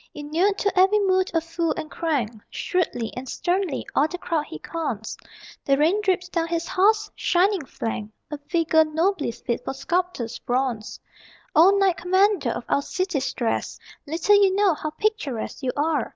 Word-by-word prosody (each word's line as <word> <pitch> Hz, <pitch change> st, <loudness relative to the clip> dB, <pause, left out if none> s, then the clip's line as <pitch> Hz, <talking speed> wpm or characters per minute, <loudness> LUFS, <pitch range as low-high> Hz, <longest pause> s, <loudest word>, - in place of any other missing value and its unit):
Inured 330 Hz, +7 st, 0 dB
to 400 Hz, -2 st, +1 dB
every 385 Hz, +3 st, +5 dB
mood 375 Hz, -1 st, +2 dB
of 325 Hz, -, +2 dB
fool 330 Hz, 0 st, -1 dB
and 310 Hz, -, -5 dB
crank, 290 Hz, -10 st, -1 dB, 0.2 s
Shrewdly 325 Hz, -, -2 dB
and 255 Hz, 0 st, -6 dB
sternly 360 Hz, -3 st, -1 dB
all 290 Hz, -, +3 dB
the 360 Hz, -, -6 dB
crowd 325 Hz, -4 st, -1 dB
he -, -, -7 dB
cons: 250 Hz, -, -4 dB, 0.5 s
The 275 Hz, -1 st, +2 dB
rain 335 Hz, +8 st, +3 dB
drips 370 Hz, -3 st, 0 dB
down 335 Hz, -2 st, -1 dB
his 335 Hz, 0 st, -2 dB
horse's 420 Hz, +3 st, +2 dB
shining 370 Hz, 0 st, +2 dB
flank, 225 Hz, -4 st, -4 dB, 0.2 s
A 300 Hz, -, -4 dB
figure 320 Hz, +1 st, +2 dB
nobly 320 Hz, +2 st, 0 dB
fit 235 Hz, 0 st, -4 dB
for -, -, -4 dB
sculptor's 345 Hz, -6 st, -2 dB
bronze. 245 Hz, -3 st, -2 dB, 0.6 s
O 330 Hz, +5 st, +8 dB
knight 385 Hz, -3 st, +3 dB
commander 375 Hz, -, +2 dB
of 235 Hz, -, -4 dB
our 280 Hz, -, +2 dB
city 370 Hz, 0 st, -2 dB
stress, 260 Hz, -3 st, -2 dB, 0.3 s
Little 370 Hz, +7 st, +3 dB
you 380 Hz, -1 st, +3 dB
know 400 Hz, -3 st, +4 dB
how 310 Hz, 0 st, -4 dB
picturesque 310 Hz, -, -2 dB
you 260 Hz, -2 st, -1 dB
are! 295 Hz, -3 st, 0 dB
330 Hz, 165 wpm, -24 LUFS, 280-375 Hz, 0.6 s, O